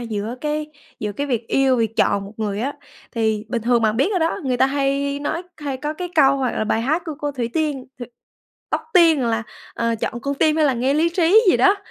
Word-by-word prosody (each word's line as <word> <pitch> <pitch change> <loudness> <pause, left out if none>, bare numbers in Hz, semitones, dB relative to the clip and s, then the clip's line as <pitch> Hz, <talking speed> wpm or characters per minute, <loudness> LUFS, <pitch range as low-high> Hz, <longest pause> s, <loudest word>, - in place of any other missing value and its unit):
giữa 225 -1 -4
cái 300 0 -2 0.3
giữa 210 -1 -3
cái 285 +7 -3
việc 240 -4 -2
yêu, 270 -2 +3
việc 225 -1 -1
chọn 200 -1 +2
một 200 - -10
người 210 -1 -2
á, 275 +4 -1 0.4
thì 220 -2 0
bình 230 -1 -2
thường 240 0 +2
bạn 220 0 +2
biết 280 - +2
rồi 380 - +1
đó, 325 0 0
người 255 -2 0
ta 265 - +4
hay 280 0 -1
nói 320 +4 -2
hay 285 -3 -4
có 300 +3 -4
cái 360 +2 -5
câu 275 -3 +5
hoặc 260 -3 -1
là - - 0
bài 220 +1 0
hát 310 +8 0
của 315 - -5
cô 290 -2 -2
Thủy 245 -4 -3
Tiên 300 -5 -1
hự, 245 - -6 0.6
Tóc - - 0
Tiên 330 -5 +6
là, 230 -1 0 0.3
ờ, 230 0 0
"chọn 240 - -3
con 280 +3 -2
tim 310 +2 +2
hay 315 - +3
là 275 - +2
nghe 260 +4 +1
lý 325 +2 +3
trí" 345 +5 +4
gì - - +3
đó. 395 +1 +4
270 Hz, 245 wpm, -21 LUFS, 230-305 Hz, 0.6 s, Tiên